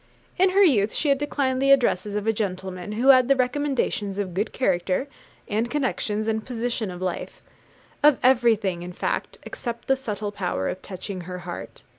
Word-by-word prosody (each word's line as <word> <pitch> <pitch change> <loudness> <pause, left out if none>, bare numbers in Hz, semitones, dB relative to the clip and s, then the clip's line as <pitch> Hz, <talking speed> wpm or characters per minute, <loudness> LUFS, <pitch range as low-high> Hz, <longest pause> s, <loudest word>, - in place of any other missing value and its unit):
In 375 +1 +5
her 395 +2 +5
youth 220 - +3
she 300 - 0
had 275 -1 +3
declined 270 -3 -1
the 275 - +3
addresses 210 -7 +3
of 210 0 -2
a 225 - +2
gentleman 190 -2 -4
who 245 +5 +2
had 255 -2 +7
the 275 - +5
recommendations 255 -6 -1
of 195 -3 -3
good 205 +5 -1
character, 190 +1 0 0.4
and 220 +3 -1
connections, 225 -6 -1
and 220 -1 0
position 240 -3 -3
in 180 -1 -7
life, 185 -1 -4 0.6
of 295 -2 +6
everything, 225 -8 +3
in 180 +1 -7
fact, - - -3
except 235 -1 -6
the 270 - +4
subtle 215 -5 -4
power 180 - -2
of 185 - -5
touching 185 0 -6
her 180 +1 -6
heart. 175 - -8
220 Hz, 180 wpm, -24 LUFS, 190-260 Hz, 0.6 s, had